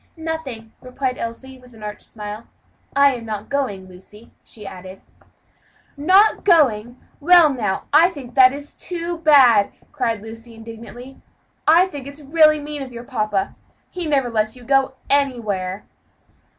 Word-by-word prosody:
"Nothing," 305 -9 -6
replied 255 0 -4
Elsie, 260 +3 -7
with 250 -2 -18
an 215 - -13
arch 210 0 -7
smile, 210 +1 -8 0.5
"I 280 -1 +5
am 240 -2 -7
not 215 -1 -6
going, 230 -10 -3
Lucy," 190 +5 -16
she 210 -2 -12
added. 185 0 -10 1.0
"Not 375 +9 +4
going! 250 - +2 0.2
well, 330 -1 +6
now, 210 -7 -2
that 270 -7 +4
is 285 +1 -9
too 345 -1 -5
bad," 270 -10 +5 0.2
cried 230 -7 -2
Lucy, 225 +1 -11
indignantly. 230 +3 -11 0.5
"I 335 +4 +6
think 285 -8 -8
it's 285 +2 -10
really 305 +1 +4
mean 295 0 -6
of 265 -2 -7
your 235 0 -9
papa; 215 -6 -2 0.4
he 355 -3 -5
never 270 -5 0
lets 215 0 -1
you 250 - -14
go 270 +1 +1
anywhere." 215 -9 -1
255 Hz, 140 wpm, -20 LUFS, 220-290 Hz, 1.0 s, well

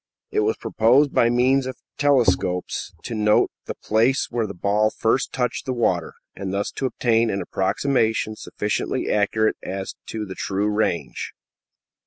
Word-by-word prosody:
It - - +1
was 105 +1 +1
proposed, 130 +6 +3
by 120 - +4
means 130 +2 +3
of 130 -2 -6 0.2
telescopes, 110 -10 +1
to 120 - -5
note 105 -1 +3
the - - -5
place 115 +5 +1
where 115 -2 0
the 100 - -7
ball 105 +4 +2
first 115 +4 0
touched 125 +2 -2
the 130 - 0
water, 90 -8 0 0.2
and 95 -1 -4
thus 100 +1 -1
to 135 - -2
obtain 115 -2 +2
an 100 - -1
approximation 110 +2 0
sufficiently 105 -1 -2
accurate 110 +1 +2
as 95 0 -5
to 110 -1 -4
the 95 - -7
true 100 +2 -1
range. 105 -5 -1
110 Hz, 155 wpm, -23 LUFS, 100-125 Hz, 0.2 s, by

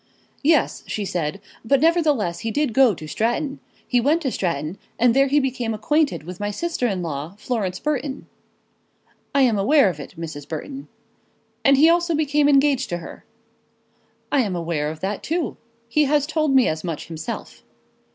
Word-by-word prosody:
"Yes," 300 -2 +2
she 210 - -3
said, 170 -1 -2 0.2
"but 270 +4 +3
nevertheless 295 - +2
he 225 - -3
did 285 0 0
go 255 -4 +5
to 155 - -9
Stratton. 255 - -1 0.3
He 245 -2 +2
went 310 +7 +2
to 265 - 0
Stratton, 170 -1 -2 0.2
and 245 -1 +4
there 275 +2 +4
he 290 +2 +3
became 250 -4 -2
acquainted 295 - +1
with 180 +2 -8
my 205 0 -2
sister 285 +3 -1
in 190 -5 -2
law, 155 +2 -5
Florence 210 -5 -2
Burton." 285 -2 -3 1.1
"I 275 - +5
am 230 -5 +3
aware 275 +2 +5
of 160 -5 -6
it, 145 - -9
Mrs. 155 -4 -7
Burton." 270 - -6 0.8
"And 275 0 +5
he 305 +4 +6
also 340 0 +3
became 295 -1 +2
engaged 275 -2 +3
to 175 - -2
her." 170 - -11 1.1
"I 285 - +3
am 200 -6 -1
aware 165 -3 -1
of 155 0 -8
that 195 +1 -2
too. 320 -5 -2 0.3
He 300 +6 +2
has 290 0 +2
told 310 -2 +1
me 260 - +5
as 155 0 -2
much 165 -4 -4
himself." 160 -1 -7
245 Hz, 175 wpm, -22 LUFS, 180-290 Hz, 1.1 s, he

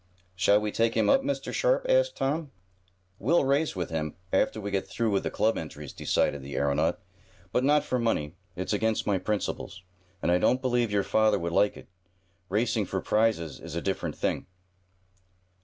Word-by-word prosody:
"Shall 100 +3 +4
we 105 0 -2
take 115 +1 +1
him - - +4
up, 270 -1 +5
Mr. 280 +1 -3
Sharp?" - - +2
asked - - +3
Tom. 150 +2 -1 0.7
"We'll 140 - +3
race 140 +1 +1
with 90 -3 -3
him, 75 -2 -3 0.2
after 95 - +2
we 100 -1 -4
get 95 -1 -1
through 115 -2 -1
with 100 - +2
the - - -2
club 110 +1 +1
entries," 75 -3 -8
decided 70 - 0
the 70 +1 -7
aeronaut. 70 0 +1 0.5
"But 125 - +1
not 150 +2 +4
for 125 - -1
money. 80 -10 0 0.2
It's 90 +4 -2
against 110 +1 0
my 100 -2 +1
principles, 95 -1 -3 0.4
and 85 - 0
I 90 - +4
don't 125 +7 +3
believe 120 -3 +1
your 100 -1 +1
father 110 +1 +3
would 85 0 -3
like 100 +3 +3
it. - - -13 0.6
Racing 110 0 +1
for 95 - -2
prizes 105 -9 0
is - - -8
a - - 0
different - - -2
thing." - - -1
105 Hz, 185 wpm, -28 LUFS, 90-125 Hz, 0.7 s, up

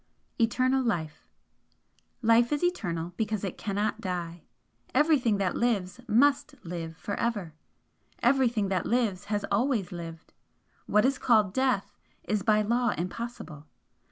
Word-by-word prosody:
ETERNAL 255 +3 +2
LIFE 165 -10 -3 1.0
"Life 230 +2 +4
is 295 +3 0
eternal 175 - -1
because 215 -2 -1
it 195 - -3
cannot 210 +2 -2
die. 175 -3 -4 0.5
Everything 265 -7 +3
that 195 -2 0
lives 205 -4 0
MUST 285 +5 +3
live 165 -1 -6
for 205 - -5
ever. 205 -9 -2 0.7
Everything 240 -5 +3
that 185 -3 -1
lives 220 -6 0
has 205 0 -1
ALWAYS 215 -3 +1
lived. 165 -2 -8 0.5
What 210 +2 +3
is 270 0 +1
called 215 -6 +3
death, 260 -5 0 0.3
is 210 -1 -1
by 215 +2 +3
law 240 +3 +1
impossible. 180 -5 -6
215 Hz, 130 wpm, -28 LUFS, 180-245 Hz, 1.0 s, Life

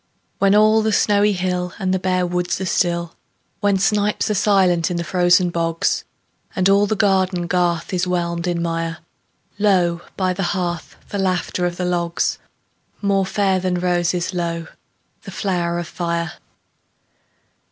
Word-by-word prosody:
When 200 0 +4
all 215 +1 +5
the 220 0 +1
snowy 205 0 +3
hill 180 -1 -2
And 190 -1 -1
the 190 - +1
bare 185 -1 0
woods 180 0 -1
are 190 - -3
still; 170 -2 0 0.5
When 200 -1 +2
snipes 210 +2 +1
are - - +2
silent 190 -5 +3
in 175 - -2
the 170 - -2
frozen 180 0 +3
bogs, 165 -1 0 0.5
And 185 0 +2
all 200 +1 +4
the 215 - 0
garden 190 -3 +1
garth 175 -1 0
is 180 0 0
whelmed 170 -1 -1
in 170 -1 -1
mire, 165 0 -2 0.6
Lo, 180 -4 +2 0.2
by 185 -1 +1
the 190 - -4 0.2
hearth, 175 -2 -3
the 200 - -3
laughter 180 -1 0
of 175 0 -5
the 180 - -2
logs— 170 -1 -1 0.6
More 195 -2 +1
fair 195 -2 +1
than 185 0 -1
roses, 175 0 0
lo, 170 -2 -2 0.6
the - - -10
flowers 175 -3 -1
of 170 - -7
fire! 170 -1 -2
180 Hz, 155 wpm, -20 LUFS, 175-195 Hz, 0.6 s, all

